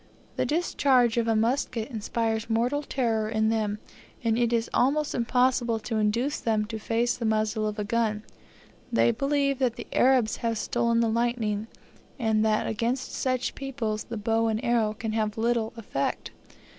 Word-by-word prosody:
The - - 0
discharge 265 -7 +2
of 230 -1 +1
a 225 - +2
musket 235 +1 0
inspires 225 0 -2
mortal 240 +6 +1
terror 230 -6 -1
in 220 0 +1
them, 215 -2 0 0.5
and 225 -1 +2
it 235 0 +1
is 230 -1 +1
almost 290 +4 +2
impossible 245 -1 +2
to 220 +1 -3
induce 230 +7 0
them 215 -2 0
to 220 -1 -4
face 230 +2 0
the 240 - -6
muzzle 215 0 +1
of 210 0 -4
a 210 - -1
gun. 215 -1 0 0.7
They 235 0 +4
believe 275 +2 0
that 250 -3 +1
the - - -7
Arabs 250 -4 +3
have 230 -1 -1
stolen 235 +1 +1
the 230 - +2
lightning, 225 -2 0 0.5
and 220 -4 +1
that 215 -1 +2
against 235 +4 -2
such 255 -1 -1
people 245 -6 -3
the 230 - -4
bow 225 +2 +1
and 220 -1 0
arrow 225 -3 +1
can 220 0 -4
have 215 -1 -1
little 230 0 +1
effect. 170 -11 -3
230 Hz, 170 wpm, -27 LUFS, 220-245 Hz, 0.7 s, They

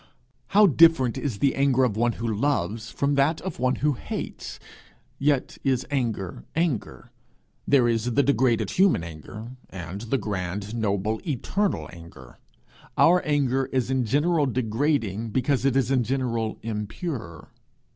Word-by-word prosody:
How 210 - +9
different 165 - +5
is 130 -8 -3
the 140 +5 +2
anger 135 -1 +2
of 120 -5 +1
one 120 +1 +1
who 115 +1 -4
loves, 110 -2 -1
from 140 +1 0
that 140 +3 +2
of 190 - -6
one 130 +1 +2
who 150 - +3
hates! 120 - -6 0.6
yet 140 -1 0
is 130 -2 +1
anger 110 - -2
anger. 160 -8 -2 0.6
There 130 -4 +4
is 115 -1 0
the 140 +4 +3
degraded 130 -4 +2
human 185 - +3
anger, 85 - -9 0.2
and 90 +2 -7
the 115 +4 -1
grand, 100 -1 -4
noble, 110 -1 -1
eternal 185 - -1
anger. 85 -7 -13 0.6
Our 180 +2 +5
anger 135 -3 +1
is 130 -1 -1
in 130 -1 +1
general 150 +5 +2
degrading, 115 -3 -1
because 130 +3 0
it 135 -2 +2
is 135 -1 +2
in 130 -2 +3
general 115 -3 -1
impure. 105 - -5
125 Hz, 145 wpm, -25 LUFS, 110-140 Hz, 0.6 s, How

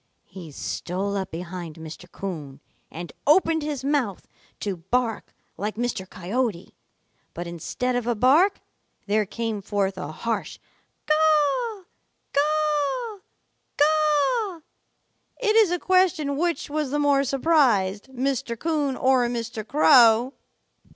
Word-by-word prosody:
He 180 -5 -11
stole 190 +7 -3
up 190 -1 -3
behind 170 -1 -7
Mr. 160 +2 -10
Coon 150 -8 -6 0.3
and 170 +2 -8
opened 320 +1 +4
his 295 -3 -4
mouth 275 -9 -1 0.3
to 200 -3 -2
bark 225 +6 -2 0.3
like 210 +2 -3
Mr. 225 -5 -3
Coyote, 200 0 -3 0.6
but 175 - -5
instead 175 +9 -3
of 245 -1 -2
a 240 - +1
bark, 295 - +4 0.4
there 210 0 +1
came 225 0 -3
forth 195 -1 -1
a 180 - -5
harsh 225 +5 -3 0.5
'Caw, 315 - +2 0.5
caw, 305 - 0 0.6
caw.' 310 - +2 0.8
It 435 -3 +1
is 440 -4 +6
a 355 - 0
question 360 -6 +2
which 340 +3 -1
was 300 -1 -2
the 290 - -1
more 285 -1 +3
surprised, 260 - +2
Mr. 265 -2 -2
Coon 295 -2 -1
or 255 -2 +3
Mr. 235 -1 -4
Crow. 245 -2 +5
255 Hz, 120 wpm, -24 LUFS, 200-305 Hz, 0.8 s, is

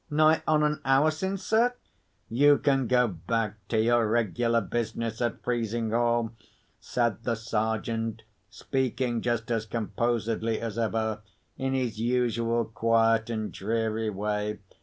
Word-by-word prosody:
"Nigh 155 +1 +4
on 155 -1 +3
an 150 0 0
hour 135 +4 +4
since, 190 +5 -3
sir." 235 +3 +2 0.5
"You 145 +5 +5
can 135 -3 +1
go 125 0 +4
back 110 +3 -2
to 110 - +1
your 115 0 +3
regular 115 +1 +1
business 115 -1 -3
at 120 -1 -2
Frizinghall," 115 0 0 0.5
said 120 -2 -1
the 120 -1 0
Sergeant, 115 0 -2 0.3
speaking 125 +2 -1
just 120 -2 -1
as 115 -1 -1
composedly 115 0 -1
as 115 -1 -4
ever, 110 -1 -1 0.3
in 135 0 -1
his 120 -5 -2
usual 115 -1 +1
quiet 115 0 +2
and 110 -2 -3
dreary 110 +1 -1
way. 105 +1 -2
115 Hz, 130 wpm, -27 LUFS, 110-125 Hz, 0.5 s, You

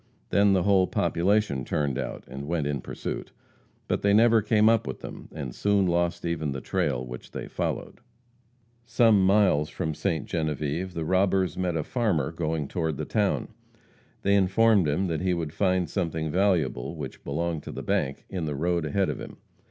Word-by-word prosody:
Then 100 0 +4
the 95 -2 +2
whole 95 -2 +4
population 95 -6 +1
turned 70 -3 -1
out, - - -5
and 70 +1 -7
went 80 -3 -1
in 70 -2 -2
pursuit. - - -5 0.6
But - - 0
they 100 0 +4
never 115 0 +5
came 105 0 +3
up 115 -9 +3
with 65 - -5
them, - - -9
and 70 -6 -6
soon 100 +3 +2
lost 85 -1 0
even 80 -4 -1
the 70 - -4
trail 65 -1 -1
which 60 0 -9
they - - -6
followed. - - -4 0.8
Some 115 -4 +4
miles 95 -7 +3
from 80 - -3
Ste. 80 -1 -2
Genevieve 80 +3 -2
the 80 -1 -2
robbers 95 -1 +2
met 90 -2 -1
a 80 - -1
farmer 95 - 0
going 80 -3 -2
toward 80 -2 -2
the - - -3
town. - - 0 0.7
They 100 - +3
informed 100 0 +4
him 75 +7 +1
that 80 -3 -2
he 90 -1 +1
would 80 -3 -4
find 90 -2 +1
something 80 -3 -2
valuable, 85 -10 +1
which - - -7
belonged 80 +2 -2
to - - -8
the - - -6
bank, 70 +1 -1
in 90 -4 -4
the 75 -2 -3
road 85 +2 0
ahead 95 +5 +1
of - - -6
him. - - -9
85 Hz, 185 wpm, -26 LUFS, 75-100 Hz, 0.8 s, never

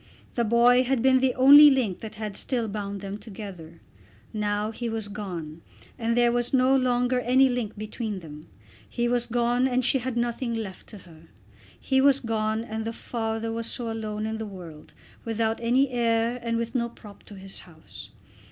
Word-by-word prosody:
The 235 - 0
boy 240 +3 +5
had 255 -2 0
been 260 0 +5
the 255 -1 +1
only 285 +3 +9
link 250 -9 0
that 215 -1 -8
had 210 -2 -5
still 240 -4 -2
bound 200 -1 -5
them 200 +1 -6
together. 190 -7 -10 0.5
Now 210 0 -1
he 235 +1 -4
was 225 -2 -4
gone, 175 -6 -7 0.4
and 230 0 0
there 240 0 +4
was 240 +2 0
no 260 +1 +4
longer 250 -1 +1
any 255 +2 +4
link 245 -5 -3
between 215 0 -4
them. 150 -2 -11 0.4
He 240 0 -1
was 240 0 0
gone 240 +2 +1
and 255 -1 0
she 265 - +2
had 250 0 -4
nothing 235 0 -1
left 205 -5 -6
to 215 - -11
her. 165 -3 -16 0.5
He 265 0 +1
was 275 0 +5
gone, 220 -2 -1
and 220 -1 -5
the 225 +1 -4
father 225 -1 -3
was 230 0 -3
also 230 -2 -3
alone 215 -1 -4
in 220 0 -3
the 220 - -4
world, 170 -6 -11 0.3
without 225 0 -1
any 255 +4 +2
heir 235 0 0
and 230 -1 -1
with 230 0 -3
no 235 -2 0
prop 210 -3 -14
to 205 - -12
his 195 0 -7
house. 160 -3 -12
230 Hz, 190 wpm, -26 LUFS, 210-245 Hz, 0.5 s, only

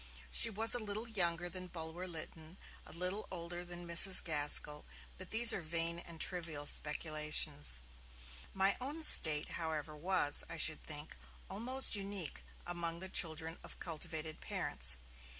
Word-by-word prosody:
She 60 - +7
was 225 +1 0
a 245 - +1
little 215 +1 -3
younger 175 -5 -1
than 185 +1 -8
Bulwer 165 +1 -7
Lytton, 160 0 -10 0.3
a - - -11
little 180 +5 -1
older 175 0 -7
than 175 0 -9
Mrs. 170 +3 +8
Gaskell 150 -1 -1 0.4
but - - -9
these 230 +1 +5
are - - -5
vain 165 +1 -2
and 170 -1 -13
trivial 165 -5 -2
speculations! 150 - +1 0.7
My 195 +1 0
own 295 +5 -7
state, 155 - +7
however, 155 -2 -6
was, 150 -2 +1
I - - -9
should 160 - 0
think, 150 0 -9 0.4
almost 245 +6 +1
unique 195 -4 -6 0.2
among 170 -1 -5
the 190 +1 -9
children 165 -2 -1
of - - -11
cultivated 160 -1 -6
parents. - - -2
170 Hz, 145 wpm, -34 LUFS, 155-190 Hz, 0.7 s, Mrs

